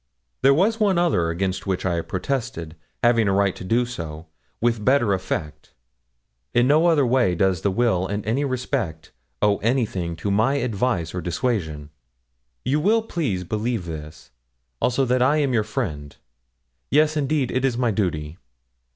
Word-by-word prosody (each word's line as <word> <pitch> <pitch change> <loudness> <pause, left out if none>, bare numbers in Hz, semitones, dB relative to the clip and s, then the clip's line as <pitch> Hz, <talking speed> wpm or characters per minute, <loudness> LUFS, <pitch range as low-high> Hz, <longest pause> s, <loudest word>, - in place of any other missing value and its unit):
There 135 - +6
was 215 +8 +2
one 200 -4 +3
other 160 - +2
against 95 +3 -2
which 95 -1 -1
I 85 -2 0
protested 95 - -4 0.3
having 115 -2 +4
a 100 - +2
right 100 -1 +2
to - - -9
do 115 +6 +1
so 80 -9 -7 0.3
with 115 -2 0
better 125 -4 +3
effect. 75 -5 -4 0.8
In 120 +1 +4
no 155 +4 +4
other 155 -5 +4
way 120 -8 +2
does 95 -2 +1
the 100 - +1
will 95 -3 +1
in 100 +1 -3
any 120 +7 0
respect 125 - -3 0.3
owe 105 -1 +4
anything 105 -8 -1
to 90 +5 -3
my 110 +7 +2
advice 115 - -1
or 90 - -3
dissuasion. 85 - -2 0.7
You 140 +4 +2
will 215 +7 +3
please 135 - -2
believe 110 +1 -2
this; 75 -3 -9 0.5
also 130 +2 +2
that 125 0 +1
I 145 +4 +4
am 140 -4 +1
your 115 - +3
friend. 80 - -4 0.7
Yes, 155 +2 +3
indeed, 145 -3 0
it 130 - -1
is 130 -3 +1
my 120 -2 +1
duty.' 85 -6 -2
110 Hz, 160 wpm, -23 LUFS, 90-130 Hz, 0.8 s, There